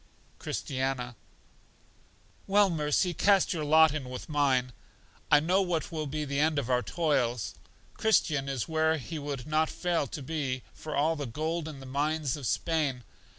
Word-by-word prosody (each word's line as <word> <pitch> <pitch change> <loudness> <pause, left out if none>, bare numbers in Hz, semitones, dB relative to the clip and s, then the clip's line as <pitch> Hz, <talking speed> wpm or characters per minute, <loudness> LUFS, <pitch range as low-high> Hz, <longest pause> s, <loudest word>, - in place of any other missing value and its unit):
Christiana: 130 -2 -3 1.3
Well, 200 -1 +4
Mercy, 155 +3 +1
cast 195 +3 +3
your 160 -3 -2
lot 155 0 +6
in 140 -5 -4
with 125 - -7
mine; 135 -4 +1 0.6
I 150 - +7
know 180 +6 +2
what 175 -4 -1
will 155 -2 -3
be 150 +2 -3
the 140 0 -2
end 155 0 +2
of 130 -3 -1
our 125 0 +3
toils. 125 - 0 0.4
Christian 150 -10 +2
is 135 -4 -2
where 160 0 +2
he 155 +4 -6
would 140 -3 -5
not 155 +1 +1
fail 175 -5 -1
to 145 - -7
be 135 -4 -3
for 155 -1 -6
all 155 +3 +2
the 145 -3 -4
gold 160 +6 -2
in 150 -3 -7
the - - -9
mines 145 +1 -1
of 140 -5 -5
Spain. 150 -7 0
150 Hz, 165 wpm, -29 LUFS, 135-160 Hz, 1.3 s, I